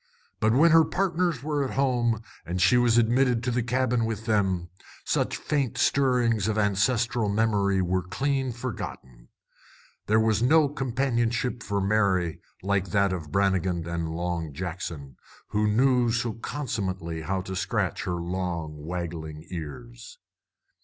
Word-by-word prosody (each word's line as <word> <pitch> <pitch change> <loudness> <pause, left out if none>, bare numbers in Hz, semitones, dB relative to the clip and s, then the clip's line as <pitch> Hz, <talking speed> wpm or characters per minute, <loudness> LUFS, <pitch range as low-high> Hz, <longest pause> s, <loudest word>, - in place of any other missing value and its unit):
But 110 +1 +3
when 155 +6 +5
her 165 0 +7
partners 175 -6 0
were 145 -1 0
at 130 - -4
home, 120 -5 +1 0.2
and 90 +2 -3
she 90 - +5
was 120 -1 +4
admitted 120 +1 +3
to 125 - 0
the 120 +1 +1
cabin 125 0 +1
with 110 -1 -3
them, 95 -6 +1 0.4
such - - 0
faint 140 -6 -1
stirrings 120 -6 +2
of 110 0 0
ancestral 110 +2 +1
memory 100 -3 +2
were 90 +1 0
clean 135 +8 -1
forgotten. 90 - -7 0.8
There 110 +1 +4
was 110 -1 +2
no 150 +4 +4
companionship 120 -3 -1
for 100 -2 -2
Mary 95 -4 +1 0.2
like 100 -1 0
that 100 +1 +2
of 80 -5 -6
Brannigan 95 -3 +1
and 85 -1 -2
Long 85 -2 -3
Jackson, 80 -5 -6 0.3
who 105 0 +1
knew 125 +2 +3
so 115 0 -1
consummately 95 - -4
how 95 +3 -2
to 95 0 -6
scratch - - -1
her 90 - -1
long, 85 -4 -4
waggling 80 -2 -5
ears. 115 - -8
105 Hz, 140 wpm, -26 LUFS, 90-125 Hz, 0.8 s, her